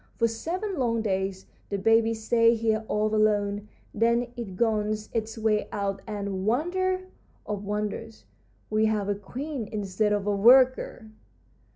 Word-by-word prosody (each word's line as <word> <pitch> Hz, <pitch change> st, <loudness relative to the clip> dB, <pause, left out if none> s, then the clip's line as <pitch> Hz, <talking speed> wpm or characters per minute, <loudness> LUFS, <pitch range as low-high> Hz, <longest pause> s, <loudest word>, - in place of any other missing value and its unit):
For 230 Hz, -, +3 dB
seven 355 Hz, -, -3 dB
long 230 Hz, -3 st, +1 dB
days 190 Hz, -2 st, -2 dB, 0.2 s
the 200 Hz, -, -1 dB
baby 225 Hz, +3 st, +3 dB
stays 230 Hz, +1 st, +3 dB
here 220 Hz, -1 st, +1 dB
all 215 Hz, +1 st, 0 dB
alone, 205 Hz, -1 st, +1 dB, 0.3 s
then 235 Hz, +2 st, +1 dB
it 200 Hz, -6 st, -7 dB
gnaws 215 Hz, -2 st, 0 dB
its 220 Hz, 0 st, -3 dB
way 215 Hz, -1 st, +1 dB
out, 195 Hz, -1 st, -2 dB
and, 200 Hz, -3 st, -3 dB
wonder 370 Hz, -, 0 dB, 0.4 s
of 205 Hz, -1 st, -4 dB
wonders, 210 Hz, +2 st, -4 dB, 0.5 s
we 215 Hz, 0 st, +3 dB
have 210 Hz, -2 st, 0 dB
a -, -, +3 dB
queen 245 Hz, +5 st, -5 dB
instead 210 Hz, 0 st, -1 dB
of 205 Hz, -1 st, 0 dB
a 205 Hz, -1 st, +1 dB
worker! 245 Hz, 0 st, +4 dB
220 Hz, 145 wpm, -27 LUFS, 205-230 Hz, 0.5 s, worker